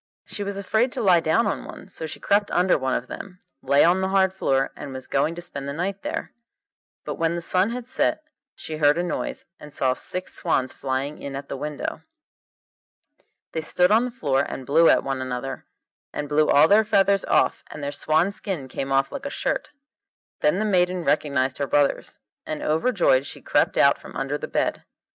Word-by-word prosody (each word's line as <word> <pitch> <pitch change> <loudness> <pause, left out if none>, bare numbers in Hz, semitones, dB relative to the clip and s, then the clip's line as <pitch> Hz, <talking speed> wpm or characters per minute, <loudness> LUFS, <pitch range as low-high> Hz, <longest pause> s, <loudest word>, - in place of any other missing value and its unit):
She 205 - -6
was 200 0 -4
afraid 220 +5 +1
to 255 - -3
lie 180 -4 +6
down 160 +8 +2
on - - -2
one, - - -10
so 165 -4 -6
she - - -8
crept 205 0 +2
under 180 +1 +3
one 130 -2 0
of 120 - -2
them, 180 +6 -9 0.2
lay 140 - +4
on 180 +3 +4
the 190 - +1
hard 190 -1 +2
floor, 135 -7 0
and 140 -2 -8
was 130 - -7
going 155 +4 0
to 175 - -7
spend 140 -4 -6
the - - -3
night 190 +5 -3
there. - - -4 0.7
But - - -5
when 165 0 +1
the - - -2
sun 185 +4 +1
had 245 0 -5
set - - 0 0.3
she 155 - -6
heard 150 0 +4
a 175 - 0
noise, 175 - -4
and 150 - -11
saw 130 -2 +1
six 185 +7 -5
swans 130 -6 0
flying 135 +2 -3
in 140 -1 -6
at 140 +1 -7
the - - -3
window. 150 +1 -4 1.5
They 160 - -2
stood 180 +4 +2
on 225 +3 +4
the - - -3
floor 145 - 0
and 135 -2 -5
blew 160 +5 +5
at - - +4
one 135 -1 -2
another, 130 +1 -5 0.4
and 150 - -4
blew 150 +1 +2
all 145 +2 +6
their 210 +5 +5
feathers 200 -2 +3
off, - - +2
and 150 - -8
their 140 - -2
swan 160 +6 +1
skin 185 -9 -5
came 135 +1 -4
off 135 0 +2
like 280 0 -5
a - - -3
shirt. - - -2 0.7
Then 150 +5 +2
the 215 - 0
maiden 180 -3 +1
recognised 140 -3 0
her 140 - -1
brothers, 145 +1 +1 0.3
and 155 - -5
overjoyed 160 - +2
she - - -8
crept - - +1
out - - +5
from - - -12
under - - -2
the - - -5
bed. - - -1
160 Hz, 205 wpm, -24 LUFS, 140-190 Hz, 1.5 s, lie